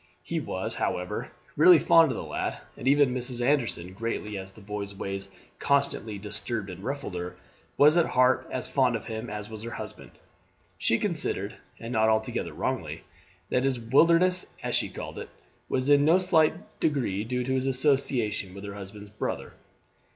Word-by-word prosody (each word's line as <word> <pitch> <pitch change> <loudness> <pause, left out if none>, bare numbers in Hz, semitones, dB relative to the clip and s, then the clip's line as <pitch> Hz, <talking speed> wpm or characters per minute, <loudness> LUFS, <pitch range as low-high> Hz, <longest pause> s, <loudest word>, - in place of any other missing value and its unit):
He - - -2
was, - - -3
however, - - -2 0.2
really 360 -1 +8
fond 165 -2 +6
of - - -3
the - - -4
lad; - - -3 0.2
and 130 - -6
even 140 -2 +5
Mrs. 125 -1 -4
Anderson, 120 -9 0
greatly 105 0 -3
as 95 0 -6
the 105 - -15
boy's 100 0 -5
ways 95 0 -5 0.3
constantly 140 -7 0
disturbed 105 0 -3
and 90 +1 -10
ruffled 140 -5 -4
her, 90 0 -5 0.4
was 150 +2 +7
at 170 - +4
heart 130 +1 +3
as 130 - -3
fond 130 -4 +2
of 115 - -5
him 110 -1 -5
as 105 0 -5
was 110 -1 -8
her 115 - -5
husband. - - -8 0.7
She - - +3
considered, - - -1 0.2
and 115 +2 -6
not 110 -1 +3
altogether 110 0 0
wrongly, - - -3 0.5
that 125 - +2
his 135 -2 +1
wilderness, 170 +9 +4 0.2
as - - -2
she - - +1
called - - -7
it, - - -7 0.4
was 130 0 0
in 145 0 +6
no 160 +4 +6
slight 175 -1 +1
degree 120 -10 0
due 125 +2 -2
to 130 +1 -1
his 130 0 0
association 125 -8 +1
with 100 - -9
her 100 -1 -6
husband's 100 +1 -9
brother. 105 - -4
120 Hz, 175 wpm, -27 LUFS, 105-140 Hz, 0.7 s, really